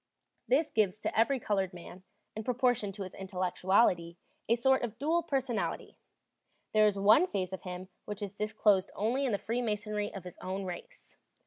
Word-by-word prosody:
This 300 +5 +2
gives 210 -3 +2
to - - -2
every 255 +5 +3
colored 195 -4 -1
man, 175 +1 -10 0.3
in 220 - -4
proportion 245 -4 +1
to 200 0 -5
his 185 - -8
intellectuality, 185 -1 +1 0.3
a 230 - +5
sort 265 +2 +3
of 230 -2 -4
dual 325 +4 +1
personality; 260 - -2 0.8
there 215 0 +6
is 205 -1 0
one 215 - +6
phase 190 - -2
of 190 - -5
him 180 0 -6 0.2
which 210 0 -5
is 200 -1 -5
disclosed 210 -2 +2
only 250 +6 0
in - - 0
the 205 - +1
freemasonry 210 -1 -2
of 195 - -8
his 180 -1 -10
own 190 +1 -4
race. 180 -2 -9
210 Hz, 175 wpm, -31 LUFS, 190-235 Hz, 0.8 s, there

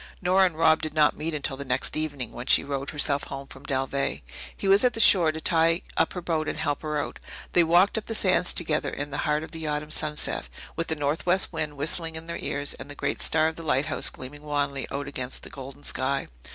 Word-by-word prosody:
Nora 185 +1 +4
and 160 -3 -7
Rob 160 -1 +4
did 155 0 -4
not 150 -1 +4
meet 155 +1 -3
until 140 -2 0
the 140 - -5
next 125 -2 -1
evening, 145 -5 -3
when 120 +1 -8
she - - +6
rowed 140 0 -3
herself 145 -1 +1
home 135 0 -7
from 135 +1 -13
Dalveigh. 135 - -1 0.4
He 195 - -3
was 195 +3 +6
at 250 -2 +4
the 225 - -4
shore 175 -7 +6
to 160 - -6
tie 165 +1 +3
up 160 - +2
her 180 - -5
boat 160 -2 -1
and - - -2
help 145 -2 -1
her 155 -1 -2
out. - - -5 0.3
They 175 - +6
walked 175 +6 +4
up 215 - -14
the 225 - 0
sands 185 -3 +3
together 160 -3 0
in 145 0 -5
the 145 - -3
heart 150 +1 +1
of - - -9
the 160 -1 -6
autumn 150 0 -2
sunset, 150 - -1 0.3
with 165 - -2
the 160 - 0
northwest 165 +6 +2
wind 155 -2 -3
whistling 160 +3 -1
in 160 0 -7
their 170 0 -5
ears 145 0 -2
and - - -10
the 145 - -9
great - - -2
star 160 -1 +3
of 160 - -4
the - - -6
lighthouse 145 -2 +1
gleaming 140 +3 -10
wanly 145 -2 -2
out 140 +1 -4
against 130 -2 -3
the - - -9
golden 135 +2 -9
sky. 135 +1 -1
150 Hz, 240 wpm, -26 LUFS, 140-165 Hz, 0.4 s, she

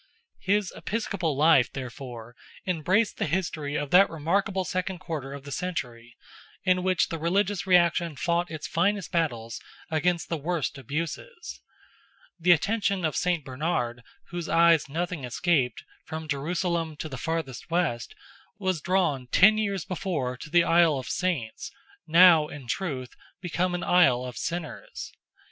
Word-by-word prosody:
His 200 0 0
episcopal 195 -9 -2
life, 145 -4 +5
therefore, 120 -2 -8 0.3
embraced 185 +5 +1
the - - -1
history 155 -3 -2
of 145 -2 -2
that 190 +2 +7
remarkable 190 +5 0
second 185 +1 -2
quarter 160 -7 -5
of 140 -1 -8
the 145 - -9
century, 120 -10 -5 0.5
in 185 -1 +3
which 185 -1 +1
the 165 - -4
religious 190 +3 0
reaction 170 -3 +3
fought 170 +4 0
its 155 -2 -6
first 195 +5 0
battles 120 -9 -2 0.3
against 170 +2 +1
the 165 - -2
worst 155 -2 -2
abuses. 165 - -5 0.8
The 175 +2 0
attention 195 +1 +2
of 155 - -1
Saint 175 -5 0
Bernard, 130 -3 -2 0.3
whose 175 -1 -5
eyes 165 -3 +4
nothing 170 0 -3
escaped, 125 0 0 0.2
from 160 0 -6
Jerusalem 165 +2 -1
to 155 - -5
the 140 - -7
farthest 160 -5 -4
west, 165 -9 -1 0.4
was 185 -5 -1
drawn 170 -8 0
ten 215 +10 +5
years 200 -6 -1
before 160 -9 -2
to 140 +5 -10
the 170 +2 +5
Isle 165 -3 +4
of 130 - -6
Saints, 165 -12 -2 0.4
now, 165 -2 +7
in 145 -3 -9
truth, 130 -3 -3 0.2
become 175 0 -1
an 175 - -3
Isle 130 -9 +4
of 125 -2 -7
Sinners. 170 +6 -5
165 Hz, 145 wpm, -27 LUFS, 140-180 Hz, 0.8 s, that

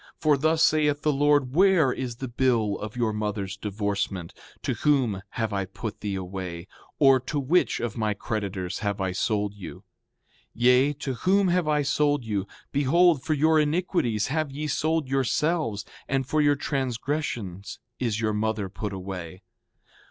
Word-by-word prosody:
For 155 -2 +3
thus 160 +3 +2
saith 150 -2 +2
the 150 - +2
Lord: 145 -2 +2
Where 175 -6 +4
is 125 -3 -4
the 130 +2 -5
bill 115 -4 +1
of 105 +1 -6
your 115 -3 0
mother's 105 -2 -3
divorcement? 100 -3 -3 0.3
To - - 0
whom 130 -10 +1 0.2
have 110 -3 -1
I 100 -1 -1
put 100 +3 -7
thee 100 -2 -3
away, 90 -2 -5 0.3
or 135 -2 +6
to 140 +4 -3
which 155 +7 +2
of 120 -3 -3
my 105 -1 0
creditors 100 -4 -3
have 100 -1 -2
I 95 -1 -1
sold 105 +2 -1
you? 95 -5 -10 0.7
Yea, 125 +4 +4
to 140 -2 -4
whom 190 - +2
have 175 -2 +1
I 150 -1 +2
sold 145 -2 +1
you? 100 -3 -2 0.2
Behold, 150 +2 +4
for 155 - 0
your 155 +2 +4
iniquities 150 - +1
have 155 +1 0
ye 150 +3 -4
sold 155 0 0
yourselves, 135 -2 0 0.2
and 135 -1 0
for 155 +3 +1
your 145 -1 +4
transgressions 130 - -3 0.2
is 115 -4 -1
your 110 -2 0
mother 105 -2 -1
put 100 +1 -5
away. 95 -1 -7
125 Hz, 160 wpm, -26 LUFS, 100-150 Hz, 0.7 s, or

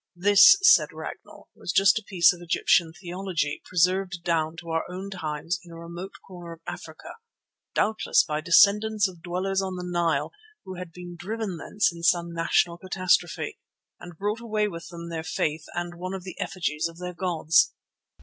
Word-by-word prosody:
This, 205 - +7
said 370 0 +6
Ragnall, - - -10
was - - -5
just 195 +4 +4
a - - -16
piece 180 -4 +4
of 175 - -12
Egyptian 170 0 +2
theology, 175 -3 -3
preserved 180 0 +1
down 165 -1 0
to 170 0 -7
our 165 0 0
own 190 +2 -6
times 165 0 -3
in 175 - -14
a 165 - -10
remote 170 +3 -8
corner 175 -3 -9
of 165 - -16
Africa, - - -9 0.6
doubtless 215 0 +2
by 150 -1 -3
descendants 205 +5 +4
of 175 -3 -12
dwellers 185 +3 -1
on 190 -1 -4
the 180 0 -5
Nile 175 -2 0 0.3
who 190 - -7
had 180 -2 -8
been 175 0 -10
driven 200 +1 -4
thence 205 +2 0
in 170 - -10
some 170 -1 +2
national 170 +1 +1
catastrophe, 185 -2 0 0.4
and 175 -2 -11
brought 210 +4 -2
away 215 -2 0
with 170 -4 -7
them 170 -1 -8
their 165 -1 -4
faith 155 -1 -2
and 175 0 -3
one 185 +2 -5
of 190 - -7
the 185 -1 -8
effigies 165 -4 -2
of 165 0 -12
their 180 0 -6
gods. 170 -3 +2
175 Hz, 180 wpm, -26 LUFS, 170-190 Hz, 0.6 s, This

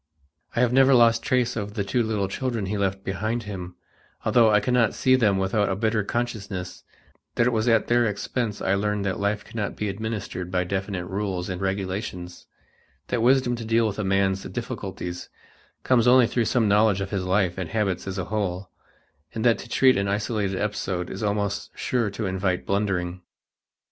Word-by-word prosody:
I 115 - +2
have 125 -1 +2
never 135 0 +6
lost 115 -1 +5
trace 125 -1 +1
of 105 -1 -4
the 100 - 0
two 120 +5 0
little 110 -3 0
children 115 0 -2
he 100 +3 -2
left 95 0 -1
behind 110 +5 -2
him, 90 -4 -7 0.5
although 115 -3 +5
I 105 -1 +5
cannot 125 -1 +2
see 130 0 +4
them 105 -6 +3
without 95 +2 +1
a 95 - 0
bitter 110 +1 0
consciousness 100 -6 -4 0.5
that 120 - +3
it 125 - +3
was 110 0 0
at 115 -2 +4
their 120 -1 +3
expense 105 +1 -3
I 95 - +2
learned 105 0 0
that 95 -2 -2
life 100 +1 -1
cannot 105 -3 -4
be 105 - -2
administered 100 -3 -4
by 90 0 0
definite 95 0 -3
rules 95 -1 -3
and 90 0 -4
regulations; 95 -2 -4 0.6
that 120 - 0
wisdom 125 0 +3
to 115 - -6
deal 115 +1 +2
with 105 -1 -2
a - - 0
man's 95 0 +1
difficulties 90 0 -5 0.5
comes 125 -2 +3
only 125 0 +7
through 115 0 0
some 115 -1 +2
knowledge 105 -1 +4
of 95 - -4
his 100 -3 -1
life 95 -1 +1
and 90 -4 -4
habits 100 -3 -1
as 95 0 -4
a 95 - -2
whole; 95 -2 -3 0.6
and 110 - -2
that 115 -1 +4
to 120 - -10
treat 130 0 +4
an 100 0 0
isolated 100 -1 -1
episode 95 -4 -2
is - - -6
almost 100 -1 -1
sure 120 -4 0
to 105 +2 -4
invite 95 -1 -1
blundering. 95 -3 -1
105 Hz, 190 wpm, -25 LUFS, 95-115 Hz, 0.6 s, only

